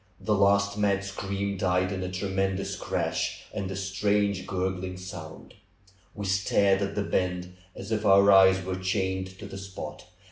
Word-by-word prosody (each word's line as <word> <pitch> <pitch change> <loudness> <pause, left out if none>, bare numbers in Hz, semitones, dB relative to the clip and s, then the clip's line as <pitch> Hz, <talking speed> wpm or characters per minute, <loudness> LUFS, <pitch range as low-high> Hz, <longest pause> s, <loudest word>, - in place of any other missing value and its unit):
The 110 - 0
last 100 0 +3
mad 100 -1 +2
scream 100 0 -3
died 90 0 +1
in 95 -1 -3
a 90 - -3
tremendous 95 0 -1
crash - - -2
and 95 -1 -3
a 95 - -4
strange 100 0 0
gurgling 95 0 -2
sound. 85 -4 -9 0.6
We 105 - -5
stared 95 0 +2
at 100 0 -2
the 105 - 0
bend 90 -2 -2 0.2
as - - -8
if 110 -1 0
our 100 0 +6
eyes 95 -1 +6
were 95 0 -2
chained 95 0 -2
to - - -9
the 95 - -7
spot. 95 -6 -8
95 Hz, 165 wpm, -27 LUFS, 95-100 Hz, 0.6 s, our